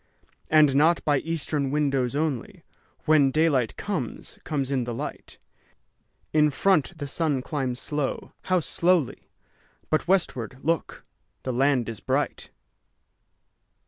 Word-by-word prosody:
And 150 -3 +5
not 160 +4 +3
by 145 -2 +3
eastern 155 -3 -2
windows 140 -3 0
only, 145 -5 -2 0.4
When 150 -3 +5
daylight 140 -5 +1
comes, 180 - -4
comes 140 -3 -2
in 130 -3 0
the 120 -1 -4
light; - - -7 1.0
In 150 -1 +5
front 165 +1 +1
the 145 - -4
sun 145 -2 -1
climbs 130 -5 -3
slow, 145 -2 -3
how 185 -1 +2
slowly! 170 -3 0 0.6
But 155 +2 +1
westward, 135 - 0
look, 165 0 -2 0.4
the 130 - -2
land 130 -1 +2
is 115 -3 -5
bright! - - -2
145 Hz, 120 wpm, -25 LUFS, 130-160 Hz, 1.0 s, And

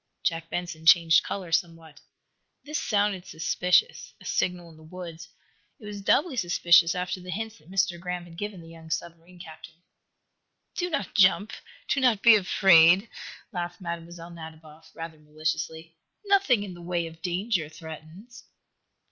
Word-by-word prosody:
Jack 165 -1 -1
Benson 175 -2 -5
changed 165 -1 +6
color 185 -4 -5
somewhat. 165 -2 -2 0.6
This 300 +2 -3
sounded 205 -3 0
suspicious 180 - 0
a - - -16
signal 175 -2 -2
in - - -17
the - - -17
woods. 165 -1 -9 0.5
It 215 - -13
was 205 -1 -7
doubly 285 - +2
suspicious 170 -3 +4
after 180 +1 -3
the 180 - -11
hints 220 +2 -5
that 155 +3 -22
Mr. 195 -2 0
Graham 180 0 -4
had 170 -1 -14
given 205 0 -6
the 165 - -13
young 165 -1 -13
submarine 170 +2 -6
captain. 165 0 -13 0.9
"Do 355 0 -2
not 210 - -3
jump 200 +2 +4 0.3
do - - +1
not 245 -6 +2
be 235 -2 +9
afraid," 185 0 +5 0.4
laughed 175 -3 -5
Mlle. 170 -2 -4 0.3
Nadiboff, 160 -1 -12
rather 165 -1 -8
maliciously. 155 +2 -4 0.3
"Nothing 390 - +3
in 195 -3 -7
the 175 - -12
way 170 0 -2
of 165 0 -11
danger 185 -2 -1
threatens." 160 - -12
175 Hz, 150 wpm, -26 LUFS, 165-195 Hz, 0.9 s, be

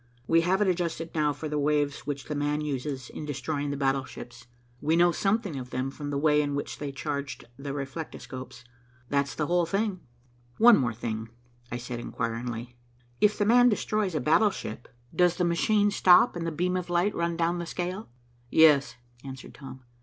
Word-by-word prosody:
We 165 +4 +4
have 190 +4 +2
it - - 0
adjusted 170 -2 -2
now 150 -2 +2
for 155 +2 -5
the 150 0 -2
waves 145 0 0
which 140 -1 -4
'the - - -4
man' 145 +1 -1
uses 135 -3 -3
in - - -7
destroying 145 0 -3
battleships. 130 -3 -3 0.3
We 155 +2 +2
know 175 +1 +5
something 195 -2 0
of 125 -1 -8
them 130 +2 -2
from 145 +1 -6
the 140 - -1
way 150 0 +3
in 145 -1 -2
which 145 - -4
they 145 -1 -4
charged 140 +2 -4
the 140 +2 -6
reflectoscopes. 130 -2 -7 0.5
That's 140 0 0
the 150 - -1
whole 175 +1 +1
thing." 195 +1 -1 0.6
"One 235 0 +8 0.2
thing 115 -1 -3
more," 110 0 -9 0.4
I 120 - -2
said 120 0 -6
inquiringly. 120 +1 -4 0.4
"If 210 0 +3
'the 205 - +1
man' 245 +3 +6
destroys 210 -4 -1
a - - +1
battleship, 155 - +1 0.3
does 180 -1 +4
the 180 - +1
machine 205 +5 +2
stop 195 +4 +5
and 165 -1 -3
the - - -1
beam 180 +4 -1
of 180 -1 -3
light 175 +4 +2
run 170 0 -1
down 170 +1 0
the 170 - -5
scale." 180 - -4 0.4
"Yes," 150 -2 +5 0.3
answered 135 -1 -9
Tom. 135 -2 -11
150 Hz, 185 wpm, -27 LUFS, 135-175 Hz, 0.6 s, One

